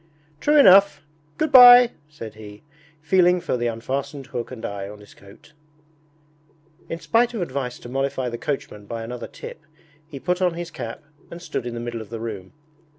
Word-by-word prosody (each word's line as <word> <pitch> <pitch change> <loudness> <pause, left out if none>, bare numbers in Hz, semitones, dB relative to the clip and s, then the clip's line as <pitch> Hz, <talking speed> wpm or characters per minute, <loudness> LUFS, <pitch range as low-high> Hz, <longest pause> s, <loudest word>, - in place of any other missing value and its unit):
'True 300 - +2
enough! 190 - +6 0.3
Good 310 -1 -1
bye!' 245 -1 +9 0.2
said 115 -8 -10
he, 105 0 -13 0.4
feeling 180 +1 +3
for 170 - -2
the 120 -1 -1
unfastened 135 +4 -4
hook 120 -2 -6
and 125 -3 -8
eye 100 -1 -6
on 105 0 -11
his 105 - -16
coat. 100 +9 -18 1.4
In 165 - -5
spite 230 +8 +1
of 215 - -3
advice 130 -5 -5
to - - -12
mollify 135 0 -2
the 120 -1 -5
coachman 105 -7 -5
by 115 0 -5
another 120 +2 -7
tip, 155 - -11 0.5
he 145 -3 -9
put 180 +4 -2
on 180 -2 +1
his 170 -1 -6
cap 115 -3 -8 0.3
and 170 - -9
stood 135 -7 -5
in 120 - -6
the - - -5
middle 120 -1 -5
of 110 - -11
the 115 0 -6
room. 105 -5 -7
135 Hz, 185 wpm, -22 LUFS, 115-175 Hz, 1.4 s, bye